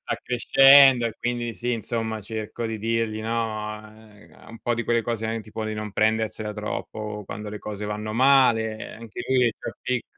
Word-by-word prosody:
Sta - - -3
crescendo 135 0 +6
e 115 0 -5
quindi 120 -1 -2
sì, 120 +1 -2
insomma, 110 -1 -3
cerco 110 +2 -5
di 110 -1 -4
dirgli, 115 0 -1
no, 110 -1 -3
uhm, 110 -1 -17
un 115 0 -11
po' 120 - 0
di 120 - -3
quelle 115 -1 +1
cose, 115 -1 -2
anche 115 0 -2
tipo 110 +1 -6
di 110 0 -3
non 105 -1 -5
prendersela 110 0 0
troppo 105 0 -5
quando 105 +1 -6
le 105 - -6
cose 105 0 -6
vanno 105 +1 -4
male, 120 -4 +3
anche 115 +1 -9
lui 130 -1 +3
è - - +5
il 115 - 0
più - - -6
pic 125 -2 -1
110 Hz, 195 wpm, -24 LUFS, 110-120 Hz, -, crescendo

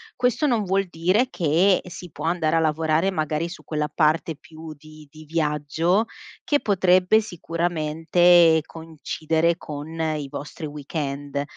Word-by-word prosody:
Questo 250 +4 +1
non 235 -5 +1
vuol 195 0 0
dire 185 +9 +1
che 175 - +2
si 180 0 -9
può 145 +1 -8
andare 165 -1 +1
a 165 - +4
lavorare 160 +3 +1
magari 155 0 -2
su 185 - -10
quella 150 -1 -2
parte 155 +1 +1
più 160 +1 -11
di 155 0 -15
di 155 0 -13
viaggio 160 +5 0 0.4
che 290 -1 +1
potrebbe 185 +1 +3
sicuramente 165 -2 +2
coincidere 160 +1 -2
con 150 -2 -7
i 155 -3 -2
vostri 150 +3 -7
weekend. 145 -1 -4
160 Hz, 135 wpm, -23 LUFS, 155-180 Hz, 0.4 s, a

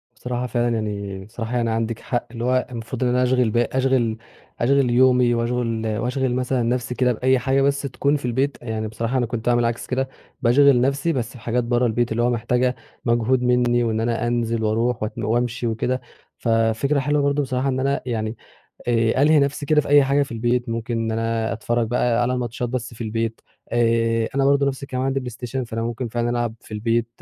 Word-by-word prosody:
بصراحة 125 0 -3
فعلًا 120 0 0
يعني 100 -3 -4
بصراحة 115 +2 -5
يعني 115 -1 0
عندِك 115 0 -1
حق 120 -2 -3
اللي 115 -1 -5
هو 130 0 +1
المفروض 115 +2 -4
إن 125 - +2
أنا 125 +1 +2
أشغِل 125 -2 +2
ب 115 - -1
أشغِل 120 -2 +1 0.4
أشغِل 135 +1 +3
يومي 125 0 +4
وأشغِل 115 -1 -1
وأشغِل 125 +1 -1
مثلًا 125 -1 0
نفسي 125 +1 -1
كده 125 -1 +2
بأي 130 +3 +2
حاجة 135 +2 +1
بس 140 0 +2
تكون 140 +1 0
في 140 - -7
البيت، 130 +3 0
يعني 110 -2 -3
بصراحة 115 +4 -2
أنا 120 - +1
كنت 115 -1 -5
باعمل 120 -1 +3
عكس 115 0 -2
كده، 130 +1 -1 0.3
باشغِل 130 +1 +5
نفسي 140 +5 +1
بس 125 -4 -2
في 125 - -12
حاجات 120 +1 -1
برّا 120 +1 +1
البيت، 120 +1 0
اللي 120 +1 +1
هو 120 - +3
محتاجة 125 +2 +1 0.3
مجهود 120 +2 +2
مني 120 -1 +3
وإن 110 -1 0
أنا 115 0 0
أنزل 115 -1 0
وأروح 115 +2 0
وأت 110 - -3
وأمشي 120 +1 -1
وكده، 125 +3 -1 0.4
ففكرة 115 +5 +1
حلوة 145 +2 +1
برضو 140 +1 +1
بصراحة 130 0 -1
إن 130 0 -1
أنا 140 +1 0
يعني 110 -2 -3 0.5
آآ، 115 +2 +2
ألهي 155 +1 +5
نفسي 140 +1 0
كده 150 +1 +4
في - - -8
أي 145 -1 +7
حاجة 140 +1 +2
في 135 - -10
البيت، 120 +1 0
ممكن 115 0 -2
إن 115 0 -1
أنا 115 0 -1
أتفرج 115 +1 -1
بقى 120 0 +1
على 125 +1 +1
ماتشات 120 0 -3
بس 125 -1 -4
في 115 - -10
البيت 115 +1 -2 0.3
آآ، 115 -1 +2
أنا 135 -1 +2
برضو 140 0 +4
نفس 140 0 -2
الكلام 130 -1 -3
عندي 135 0 0
بلايستيشن 125 +1 -5
فأنا 115 -1 -4
ممكن 120 +1 -3
فعلًا 120 +1 -1
ألعب 120 -2 -1
في 110 - -12
البيت، 115 +2 0
120 Hz, 205 wpm, -22 LUFS, 115-130 Hz, 0.5 s, أي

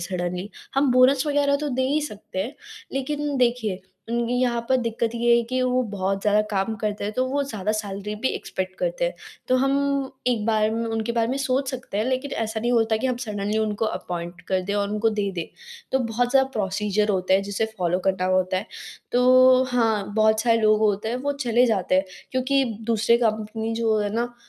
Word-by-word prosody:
Suddenly, 180 +1 -3 0.3
हम 275 0 +3
bonus 255 +3 +4
वग़ैरह 285 -1 +2
तो 295 +1 -3
दे 260 -1 -1
ही 295 +3 +1
सकते 215 -7 -7
हैं, 225 +10 -2 0.4
लेकिन 290 +2 -2
देखिए, 235 -6 +1 0.3
उनकी 235 +1 0
यहाँ 240 -2 +1
पर 260 - +4
दिक्कत 230 -1 -1
ये 235 0 +4
है 235 - +2
कि 255 +2 -2
वो 255 0 +2
बहुत 195 0 -1
ज़्यादा 210 0 +3
काम 200 +2 0
करते 210 -1 -2
हैं 210 - -2
तो 255 +3 0
वो 285 +2 0
ज़्यादा 215 -6 -2
सैलरी 210 -1 -4
भी 260 - +3
एक्सपेक्ट 185 0 -4
करते - - -1
हैं, - - -1 0.3
तो 255 - +4
हम 275 0 +1 0.2
एक 235 -4 +1
बार 215 -1 +2
म 230 +1 -1
उनके 225 +1 -1
बारे 230 -1 +1
में 260 - -1
सोच 265 0 0
सकते 255 -6 -5
हैं 215 - +1
लेकिन 260 +3 -1
ऐसा 220 0 -2
नहीं 240 +2 0
होता 225 -2 +3
कि 240 +4 -1
हम 255 - 0
सडनली 210 -3 -2
उनको 215 0 -1
अपॉइंट 175 -4 -4
कर 190 -1 +1
दें 200 +2 -2
और 200 -1 0
उनको 215 +2 +1
दे 205 -2 -1
दें। 170 -2 -3 0.5
तो 265 - +3
बहुत 245 0 0
ज़्यादा 265 0 +4
प्रोसीजर 210 0 0
होता 185 0 +2
है 195 - +3
जिसे 200 +2 -1
फ़ॉलो 180 0 +1
करना 190 -1 +1
होता 185 0 +1
है, 200 - -3 0.5
तो 255 +1 +6
हाँ, 220 -4 +1
बहुत 220 0 +3
सारे 230 -1 +3
लोग 215 -1 +4
होते 210 0 +1
हैं 235 - -1
वो 285 +3 -1
चले 250 -3 +2
जाते 195 -6 +1
हैं 190 +1 +3 0.3
क्योंकि 265 +1 +1 0.2
दूसरे 230 0 +3
कंपनी 220 0 -1
जो 225 -1 +1
है 205 0 -1
ना 240 +1 -2
225 Hz, 210 wpm, -24 LUFS, 205-255 Hz, 0.5 s, तो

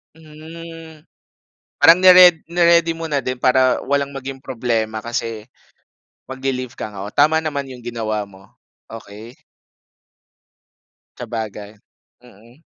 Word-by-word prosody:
Hmm, 160 0 -12 0.8
parang 165 +4 +6
ni-red 180 -3 +7
ni-ready 170 -1 +3
mo 165 0 -5
na 145 -3 -2
din 130 +1 -4
para 130 +1 +2
walang 140 0 0
maging 135 -1 -8
problema 115 -4 -2
kasi 115 -1 -5 0.8
magli-leave 130 -1 -5
ka 110 - -7
nga. 100 -1 -8
O, 105 - -11
tama 155 +2 +3
naman 145 -4 -4
'yong 125 -2 -12
ginawa 110 -2 -3
mo. 95 -1 -18 0.5
Okey. 110 +2 -11 1.8
Sabagay, 105 -2 -7 0.5
mm. 120 +6 -20
130 Hz, 115 wpm, -19 LUFS, 115-160 Hz, 1.8 s, ni-red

